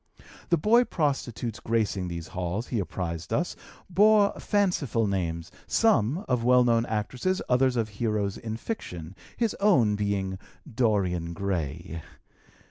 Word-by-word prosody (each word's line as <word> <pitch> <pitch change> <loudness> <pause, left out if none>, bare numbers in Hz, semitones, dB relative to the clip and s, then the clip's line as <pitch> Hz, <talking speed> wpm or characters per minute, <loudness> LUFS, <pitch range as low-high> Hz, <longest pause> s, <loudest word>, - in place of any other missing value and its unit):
The 170 - +4
boy 235 +9 +4
prostitutes 125 - -2
gracing 110 -5 0
these 85 -1 -6
halls, 90 +4 -3
he 120 - -1
apprised 85 -2 -4
us, 175 +4 0 0.3
bore 205 +2 +5
fanciful 175 - +1
names, 85 -4 -2 0.2
some 185 - +2
of 125 -2 +1
well 125 +1 +5
known 115 -1 +2
actresses, 125 - -1
others 125 0 +3
of 115 -2 0
heroes 105 -2 -1
in 110 -1 -5
fiction, 90 - -6 0.2
his 230 -3 +1
own 130 - +4
being 100 -2 -2 0.3
Dorian 95 -8 0
Gray. 85 -2 -3
110 Hz, 130 wpm, -27 LUFS, 95-135 Hz, 0.3 s, bore